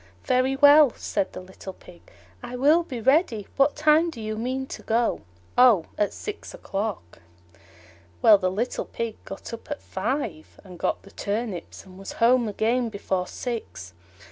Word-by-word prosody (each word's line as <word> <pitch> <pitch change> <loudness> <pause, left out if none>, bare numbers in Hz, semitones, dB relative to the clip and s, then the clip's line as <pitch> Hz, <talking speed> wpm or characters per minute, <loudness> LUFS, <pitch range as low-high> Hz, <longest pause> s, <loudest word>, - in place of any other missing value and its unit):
"Very 255 +1 +2
well," 290 +1 +7
said 195 -2 -2
the - - -8
little 190 +1 -10
Pig, 175 -1 -16 0.4
"I 245 0 -7
will 295 +7 +4
be 270 -8 -6
ready. 260 - +2
What 275 +1 +3
time 305 +2 +4
do 270 - -9
you 215 0 -4
mean 255 +4 -2
to - - -8
go?" 230 +1 0 0.3
"Oh, 240 -9 +6
at 205 -1 0
six 425 +3 -7
o'clock." 200 - -5 1.0
Well, 210 -2 +7
the 185 -1 +1
little 220 +7 -2
Pig 230 -2 -5
got 195 - -8
up 230 - -9
at 290 - -4
five, 200 - -4
and 180 -3 -12
got - - -1
the 195 - -15
turnips 205 -5 -4
and 185 0 -14
was 195 - -7
home 240 0 +3
again 230 +4 0
before 190 -3 -2
six. 215 - -6
230 Hz, 165 wpm, -25 LUFS, 195-265 Hz, 1.0 s, well